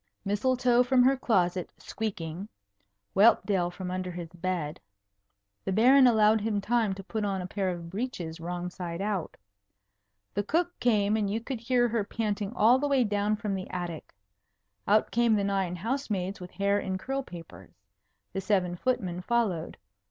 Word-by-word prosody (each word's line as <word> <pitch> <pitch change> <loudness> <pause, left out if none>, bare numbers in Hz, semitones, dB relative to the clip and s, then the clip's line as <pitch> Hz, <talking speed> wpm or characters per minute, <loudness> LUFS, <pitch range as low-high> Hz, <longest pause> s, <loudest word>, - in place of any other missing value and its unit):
Mistletoe 245 +4 +2
from 250 0 +4
her 265 +2 +5
closet, 185 -8 +1
squeaking. 190 -3 -5 0.7
Whelpdale 195 -3 +4
from 180 +1 -6
under 185 0 -3
his 175 -2 -6
bed. 175 -3 -3 0.8
The 195 - -2
Baron 255 +6 +6
allowed 220 -2 +4
him 210 -1 0
time 220 -1 +1
to 195 - -9
put 215 +2 -3
on 195 -2 -1
a 180 - -4
pair 195 0 -2
of 170 -2 -6
breeches 185 -7 -4
wrong 175 +1 -4
side 175 -2 -5
out. 200 -4 -2 1.0
The 205 - 0
cook 340 - -1
came, 210 -3 +2
and 210 -2 0
you 215 +3 -1
could 240 +1 -5
hear 240 +1 +2
her 225 -2 0
panting 205 -1 -2
all 240 +4 +5
the 290 - 0
way 275 -3 +3
down 205 0 0
from 210 -2 -3
the 190 -1 -4
attic. 175 - -6 0.7
Out 215 +2 +3
came 235 -1 +3
the 205 - +1
nine 195 -3 0
house 245 +10 -3
maids 190 -1 -2
with 180 - -7
hair 200 +2 +1
in 190 -1 -3
curl 270 +7 -3
papers. 165 - -12 0.6
The 195 - -2
seven 185 -4 +1
footmen 185 -5 -1
followed. 200 -6 -1
200 Hz, 165 wpm, -28 LUFS, 180-230 Hz, 1.0 s, Baron